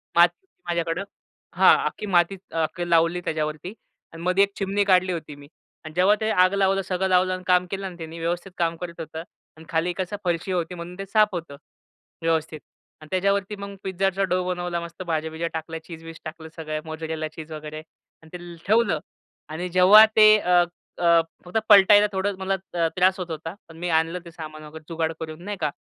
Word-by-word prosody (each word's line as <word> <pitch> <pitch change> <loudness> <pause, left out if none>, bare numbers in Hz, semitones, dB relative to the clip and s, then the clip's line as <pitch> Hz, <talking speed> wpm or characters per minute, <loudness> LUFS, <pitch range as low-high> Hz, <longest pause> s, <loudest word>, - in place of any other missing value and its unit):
माती 175 +1 +6
होती 375 - -52
माझ्याकडं. 170 +1 -1 0.5
हा - - +7
अख्खी - - -3
माती 180 -1 +2 0.2
अ, - - -5
अख्खी 175 +3 -3
लावली 170 +1 +3
त्याच्यावरती 155 +3 -3 0.4
आणि 165 - -9
मध्ये 185 +2 +4
एक 200 - -1
चिमणी 200 +1 0
काढली 185 -1 +3
होती 155 -3 -6
मी 145 0 -14 0.4
आणि 155 - -8
जेव्हा 185 +4 +4
ते 220 - 0
आग 185 -1 +4
लावलं 195 0 +2
सगळं 190 0 -1
लावलं 185 0 +3
आणि 185 0 -5
काम 180 0 +4
केलं 195 0 -3
आणि 180 -2 -7
त्यांनी 165 0 -8
व्यवस्थित 175 +3 -3
काम 170 -1 0
करत 170 -1 -7
होतं. 160 0 -6 0.3
आणि 160 - -13
खाली 165 +2 0
कसा 185 +2 -4
फरशी 175 +1 -1
होती 180 -1 -2
म्हणून 175 +1 -8
ते 195 - -4
साफ 215 +2 +4
होतं 165 -5 -5 0.7
व्यवस्थित 160 -1 -1 0.4
आणि 155 - -12
त्याच्यावरती 200 +2 0
मग 200 0 -8
पिझ्झाचा 195 +1 0
डो 185 -1 0
बनवला. 175 -1 -2
मस्त 170 +1 -8
भाज्या-बिज्या 160 -1 -2
टाकल्या, 160 0 -5
चीज-बीज 165 -1 -10
टाकलं 160 0 -8
सगळं 155 -2 -4
मोझरेला 160 0 -4
चीज 160 0 -11
वगैरे 155 0 -7
आणि 160 0 -21
ते 175 -1 -10
ठेवलं 220 -6 +3 0.5
आणि 175 +4 -4
जेव्हा 185 +5 +8
ते 215 0 +8
अ, 180 -2 +4 0.8
फक्त 180 +5 -3
पलटायला 205 0 +8
थोडं 195 +1 -1
मला 190 0 0 0.2
अ, 170 -1 +2
त्रास 185 +1 +3
होत 180 -2 -5
होता. 160 +1 -5
पण 160 - -14
मी 175 +1 -3
आणलं 165 +2 +1
ते 170 - -10
सामान 155 -2 -9
वगैरे 155 +1 -11
जुगाड 165 -1 -1
करून 160 +1 -7
नाही 205 +1 -5
का 150 - +1
175 Hz, 195 wpm, -24 LUFS, 160-190 Hz, 0.8 s, जेव्हा